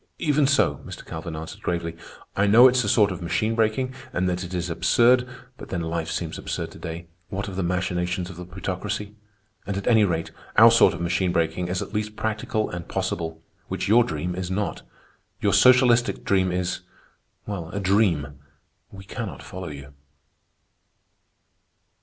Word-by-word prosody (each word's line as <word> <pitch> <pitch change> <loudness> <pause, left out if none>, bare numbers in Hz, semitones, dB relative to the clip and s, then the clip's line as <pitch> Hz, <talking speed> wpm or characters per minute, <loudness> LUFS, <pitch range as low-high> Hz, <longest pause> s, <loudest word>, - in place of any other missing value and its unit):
"Even 150 -3 +2
so," 130 - +3
Mr. - - -9
Calvin 80 0 -6
answered 80 +1 -8
gravely. 85 -1 -2 0.4
"I 100 +1 +2
know 115 +5 +8
it's 125 -1 +3
a 105 - -1
sort 105 -2 +4
of 90 -1 -6
machine 110 +6 0
breaking, 115 +3 0 0.2
and 90 +1 0
that 90 0 -1
it 90 - -7
is 90 -1 -2
absurd. 125 +8 +3 0.3
But - - -10
then 90 - -2
life 80 0 -3
seems 80 -2 -3
absurd - - -4
to - - -13
day, 85 +1 -6 0.2
what 100 0 -3
of 95 - -6
the 95 - -1
machinations 90 0 -1
of 95 - -9
the 90 +1 -8
Plutocracy. 105 +3 -4 0.5
And 100 -1 -2
at 100 - -4
any 110 -3 +5
rate, 85 -4 -1 0.3
our - - +9
sort - - +5
of - - -7
machine 90 +1 +1
breaking 85 +1 0
is 90 +1 -2
at - - -11
least 105 0 -2
practical 110 0 -1
and 85 -1 -6
possible, 80 -4 -3 0.2
which - - -3
your 115 +4 +6
dream 85 -1 -3
is 90 0 -4
not. 100 +2 -2 0.6
Your 100 -2 +1
socialistic 120 +2 +5
dream 95 -2 +2
is... 90 0 -1 0.7
well, 90 -6 -5
a 100 - -4
dream. 90 -7 +1 0.5
We 95 0 -11
cannot 110 +1 -6
follow 95 -1 -7
you." 70 0 -10
95 Hz, 175 wpm, -24 LUFS, 85-105 Hz, 0.7 s, our